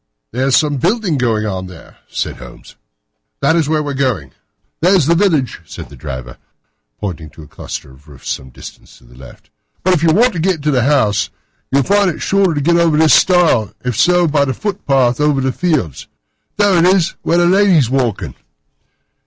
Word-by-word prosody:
"There 130 +3 -1
is 135 - +4
some 145 -2 0
building 180 - 0
going 110 -3 0
on 95 -3 -4
there," 90 -4 -14
said - - -4
Holmes; - - -13 0.6
"that 140 +4 +2
is 160 -3 0
where 155 -1 0
we 145 - -4
are - - -5
going." 120 - -2 0.5
"There's 180 -2 +3
the 165 - +3
village," 165 - 0
said - - -10
the - - -13
driver, 65 -4 -8 0.6
pointing 85 -6 -6
to 80 +1 -14
a - - -14
cluster 70 - -8
of 65 +3 -20
roofs 70 -3 -14
some 65 - -6
distance - - -13
to - - -23
the - - -19
left; 65 0 -15 0.3
"but 185 - +3
if 165 - 0
you 165 - +3
want 235 +8 +3
to 170 - -4
get 170 -3 -1
to 150 - +1
the 130 -3 +1
house, 130 -8 +1 0.4
you'll 135 +1 +2
find 200 +4 +2
it 165 - -5
shorter 195 -4 +1
to 145 - -1
get 170 +4 +2
over 165 -3 +2
this 155 -2 +4
stile, 170 - +3
and 125 0 -2
so 175 +9 +3
by 145 -2 +2
the 130 -2 -2
footpath 135 - 0
over 150 -2 +2
the 130 0 0
fields. 150 - -2 0.5
There 200 -3 +3
it 165 - +3
is, 185 -2 +2
where 170 - 0
the 175 - +3
lady 190 0 +4
is 130 -5 +1
walking." 110 - -1
145 Hz, 205 wpm, -16 LUFS, 110-175 Hz, 0.6 s, is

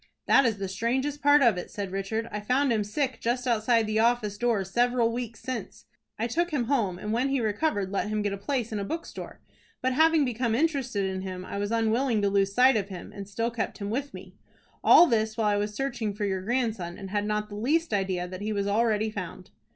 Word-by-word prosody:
"That 275 - +5
is 220 -3 -1
the 195 -1 -3
strangest 260 +9 -1
part 290 0 +6
of 225 -7 +4
it," - - -7
said 200 -2 -5
Richard. 195 +4 -2
"I 210 - -3
found 250 +5 +1
him 215 -2 +1
sick 255 +4 -2
just 245 +2 -1
outside 230 -1 +2
the 215 +1 0
office 230 -3 +2
door 225 -2 +1
several 240 +4 +1
weeks 235 -1 -5
since. 250 -6 -6 0.3
I 225 - -1
took 340 +9 0
him 290 -7 0
home, 225 -8 0
and 210 +3 -4
when 250 +4 +1
he 275 0 +1
recovered 210 -2 0
let 200 - -1
him 215 -1 -1
get 205 -1 -1
a - - -4
place 235 +2 -2
in 215 - -2
a - - -2
bookstore; 325 +11 -6 0.4
but, 260 0 0
having 320 +1 +4
become 235 -2 -1
interested 265 -8 0
in 190 0 -3
him, 185 -1 -6
I 200 - -5
was 205 0 -1
unwilling 230 +1 +1
to 200 - +3
lose 195 0 +2
sight 250 +5 +5
of 200 -1 -2
him, 180 -3 -8
and 200 -1 -8
still 230 +3 -1
kept 230 -1 -3
him 200 -1 -4
with 280 +4 -2
me. 185 0 -11 0.5
All 350 - +8
this 220 -6 0
while 220 -2 +2
I - - +1
was 210 +1 -2
searching 235 -6 -2
for 210 0 -2
your 190 -2 -1
grandson, 220 -6 -2
and 195 -1 -8
had 205 0 0
not 210 0 -1
the 205 - -8
least 295 +8 0
idea 190 -3 -1
that 185 +1 -8
he 215 +1 -2
was 200 -1 -1
already 215 +1 +1
found." 185 -2 -7
220 Hz, 235 wpm, -27 LUFS, 200-250 Hz, 0.5 s, All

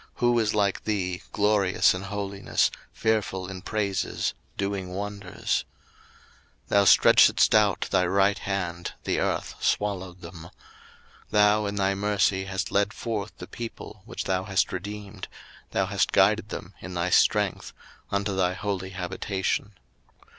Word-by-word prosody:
who 120 -1 +2
is 110 -2 +1
like 100 -2 +1
thee, 95 -3 -1
glorious 105 -2 +3
in 90 - -4
holiness, 100 0 -1 0.2
fearful 105 -4 -1
in 95 -1 -7
praises, 100 -3 -1 0.2
doing 100 -2 -2
wonders? 100 0 -3 1.0
02:015:012 - - -38
Thou 100 0 +4
stretchedst - - +6
out - - +4
thy 90 - +3
right 95 +2 +2
hand, 90 -3 -3
the - - 0
earth - - -1
swallowed 95 -3 -1
them. 85 -1 -10 0.8
02:015:013 - - -36
Thou 105 0 +4
in 100 - -3
thy 100 -1 +1
mercy 100 -1 +1
hast 95 -1 -3
led 100 +1 +1
forth 105 -3 -4
the - - -8
people 115 -3 -8
which 120 - -5
thou 95 0 -1
hast 100 -2 +1
redeemed: 100 +1 -6 0.4
thou - - 0
hast - - 0
guided - - +3
them - - -7
in 90 -1 -8
thy 90 +1 -1
strength 105 -1 +2 0.4
unto 100 0 -1
thy 90 -1 +1
holy 95 -1 -3
habitation. 95 +2 -3
100 Hz, 140 wpm, -26 LUFS, 95-105 Hz, 1.0 s, stretchedst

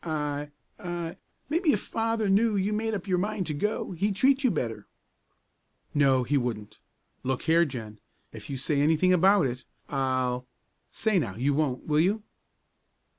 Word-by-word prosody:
"I 150 -2 -2 0.3
I 175 -1 -5 0.3
maybe 320 +2 +2
if 210 - +1
Father 225 -1 -1
knew 210 +3 +3
you'd 200 +2 0
made 220 +1 -1
up 195 - -5
your 180 -2 +1
mind 205 0 -1
to 155 - -3
go, 210 +9 -2
he'd 195 +3 -1
treat 270 +6 +3
you 255 - +5
better." 115 - -3 1.1
"No, 135 -3 +4
he 145 +4 +1
wouldn't. 115 -4 -4 0.4
Look 130 0 -2
here, 165 +1 +4
Jen! 110 -7 -7 0.3
if - - -10
you 135 - -3
say 140 +2 0
anything 160 +5 +4
about 190 0 +5
it 125 0 -3 0.3
I'll 130 -2 -1 0.4
say 215 -4 +1
now, 115 - -3
you 135 +6 +1
won't, 140 -4 -1
will 150 -1 +2
you?" 200 +6 +2
160 Hz, 165 wpm, -27 LUFS, 130-205 Hz, 1.1 s, you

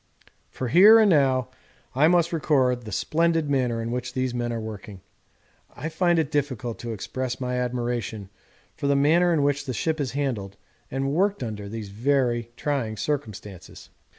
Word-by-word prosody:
For 130 - -4
here 200 - +8
and 215 -3 +5
now 130 -5 +2 0.4
I 140 +4 +4
must 170 0 +2
record 130 -6 +1
the 105 - -7
splendid 160 - +1
manner 125 -4 0
in 115 - -4
which 125 +1 -4
these 130 -1 -1
men 120 -1 -2
are 115 - -3
working. 105 -2 -8 0.7
I 160 - -5
find 175 +1 +1
it 160 -2 0
difficult 130 -5 -2
to 120 - -5
express 125 +4 -4
my 125 -1 -2
admiration 120 -4 -3 0.4
for 140 - -3
the 140 - +3
manner 165 +6 +4
in 155 -4 +2
which 140 0 0
the 130 - -2
ship 160 +3 -1
is 130 -3 -3
handled 115 -9 -3 0.3
and 135 +1 -2
worked 195 -1 +1
under 105 -3 -6
these 110 -2 -6
very 120 +1 0
trying 130 -7 -2
circumstances. 105 - -5
130 Hz, 170 wpm, -25 LUFS, 115-150 Hz, 0.7 s, here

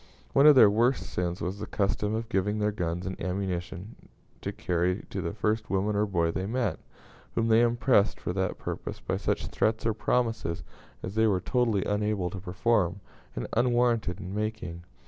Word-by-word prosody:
One 140 - +6
of 150 - +9
their 120 -5 +9
worst 120 +5 +2
sins 90 0 -3
was 95 +4 -3
the 105 - -5
custom 105 +1 0
of 115 +1 -3
giving 105 -1 0
their 105 0 +1
guns 90 -3 -3
and 95 0 -5
ammunition 95 +2 -4 0.3
to - - -3
carry 90 +1 -1
to - - -3
the 85 - -2
first 110 0 -1
woman 100 +2 0
or 105 +1 +2
boy 85 -4 +1
they 95 +3 -3
met, 115 -7 -1 0.6
whom 115 0 +1
they 110 +1 +6
impressed 120 -2 +3
for - - -3
that 95 -1 -1
purpose - - -5
by - - -2
such - - -1
threats 110 0 0
or 115 - +2
promises 110 -5 -1 0.4
as 95 - -4
they 110 +1 +3
were 95 -4 +2
totally 115 -3 +1
unable 105 -3 0
to 95 - -6
perform, 95 0 +1 0.4
and - - -3
unwarranted 120 -5 +2
in 95 -1 -6
making. 105 -5 -4
105 Hz, 185 wpm, -28 LUFS, 90-110 Hz, 0.6 s, of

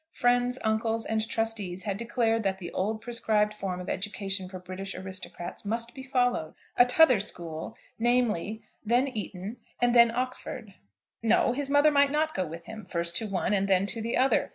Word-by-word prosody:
Friends, 245 0 +2
uncles, 225 +1 0
and 220 0 0
trustees 210 -6 -2
had 200 -2 -2
declared 230 0 0
that 195 -2 0
the 175 -3 -7
old 215 +3 -2
prescribed 215 -3 +1
form 195 -3 -4
of 180 - -7
education 195 -1 -2
for 185 - -7
British 185 +2 -7
aristocrats 185 -2 -6
must 230 +3 -2
be 265 - -8
followed, 245 - 0 0.2
a 245 - +7
t'other 255 -3 +6
school, 170 0 -5 0.2
namely, 225 -3 +1 0.2
then 240 +5 +2
Eton, 210 -3 -5 0.2
and 245 0 +3
then 235 -1 +7
Oxford. 240 -4 -3 0.5
No; 230 +2 +3
his 280 +1 -2
mother 290 +2 +5
might 285 -1 +4
not 310 +2 0
go 185 - -1
with 165 +2 -8
him, 220 -1 -8
first 170 -2 -2
to 220 - 0
one, 195 0 0
and 195 -1 +1
then 190 0 +3
to 225 +2 -2
the 230 +1 -1
other. 265 +2 +3
220 Hz, 180 wpm, -28 LUFS, 190-245 Hz, 0.5 s, a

